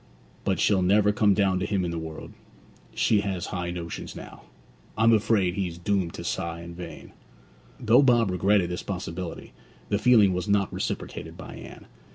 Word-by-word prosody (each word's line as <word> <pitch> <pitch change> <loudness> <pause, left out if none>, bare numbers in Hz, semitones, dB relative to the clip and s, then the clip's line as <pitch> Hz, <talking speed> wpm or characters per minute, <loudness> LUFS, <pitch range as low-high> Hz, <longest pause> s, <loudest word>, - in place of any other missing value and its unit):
But 95 -4 0
she'll 100 -3 +3
never 100 +3 +4
come 105 -1 +3
down 95 -2 +2
to 95 - -1
him 95 -4 0
in 85 - -2
the 85 - -3
world: 80 -1 -8 0.6
she 105 -2 +3
has 95 -3 -3
high 90 -1 -4
notions 85 -1 -6
now. - - -11 0.5
I 110 - +2
am 115 0 +6
afraid 105 -4 +2
he's 90 -4 -3
doomed 95 -1 -1
to - - -7
sigh 85 0 -3
in 85 0 -9
vain!' 85 -2 -9 0.7
Though 120 +2 +5
Bob 120 -6 +3
regretted 90 0 +2
this 90 - -3
possibility, 90 -2 -6 0.4
the 100 - +1
feeling 110 -6 +5
was 90 -1 -3
not 100 -1 +1
reciprocated - - -5
by - - -9
Anne. - - -11
95 Hz, 180 wpm, -26 LUFS, 85-105 Hz, 0.7 s, am